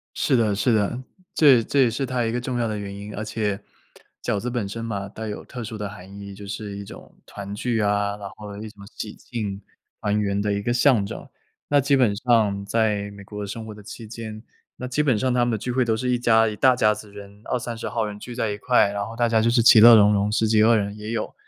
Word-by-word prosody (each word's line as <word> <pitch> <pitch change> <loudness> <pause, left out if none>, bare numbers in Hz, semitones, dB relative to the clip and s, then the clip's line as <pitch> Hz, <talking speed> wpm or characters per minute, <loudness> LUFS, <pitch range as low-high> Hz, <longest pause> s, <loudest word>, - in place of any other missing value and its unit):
是 135 - +1
的 110 -3 +2
是 105 +4 +1
的， 105 +4 0 0.3
这 135 -7 +6
这 140 +3 +1
也 120 - +3
是 130 +4 -2
它 125 -2 -1
一 115 - -1
个 120 +1 -2
重 125 -1 -3
要 115 - 0
的 105 -1 -3
原 100 -1 -6
因。 100 +1 -8
而 105 - -4
且 105 -2 -2 0.6
饺 100 - -1
子 125 - -3
本 120 -5 -2
身 115 +3 -6
嘛， 100 -3 -4
带 110 +2 -7
有 105 - -6
特 125 -3 -7
殊 110 -1 -6
的 105 -1 -4
含 100 0 -11
义， 100 -1 -9
就 100 0 -10
是 100 0 -6
一 100 - -6
种 - - -13
团 100 0 -8
聚 115 +1 -1
啊 105 0 0
然 100 -1 -7
后 105 -1 -9
一 110 +1 -7
种 100 -1 -14
喜 105 -1 -7
庆 105 -5 -5 0.4
团 105 +1 0
圆 100 -1 0
的 105 0 0
一 100 - -2
个 120 +3 -1
象 125 -5 +3
征。 - - -8 0.4
那 145 0 +4
基 140 +1 +3
本 120 -6 +3
上 105 -4 +1
在 105 -2 0
美 100 0 -11
国 105 0 -7
生 110 +2 -6
活 110 - -8
的 105 - -13
期 110 +2 -10
间 110 0 -8 0.3
那 125 - -7
基 145 +4 +1
本 130 -7 +2
上 130 +2 0
他 120 -1 +2
们 120 - 0
的 - - 0
聚 125 +4 -4
会 125 0 +1
都 110 -1 +1
是 125 +2 -2
一 125 -1 +1
家 115 -2 +4
一 - - -5
大 130 -1 +5
家 105 -3 +3
子 105 -1 -10
人， 100 0 -12
20-30 120 -2 -3
号 115 -2 -1
人 105 0 -7
聚 120 +1 -8
在 110 -4 -1
一 100 - -4
块。 105 -2 +3
然 100 0 -3
后 115 - -9
大 120 -1 +1
家 110 -1 +3
就 115 - +2
是 120 0 +3
其 115 - +8
乐 115 +1 +10
融 105 -1 +6
融 100 +1 +1
10几 110 0 +2
个 115 +1 +5
人 100 0 -3
也 105 +1 -6
有。 115 -2 -3
110 Hz, 280 characters per minute, -23 LUFS, 100-120 Hz, 0.6 s, 乐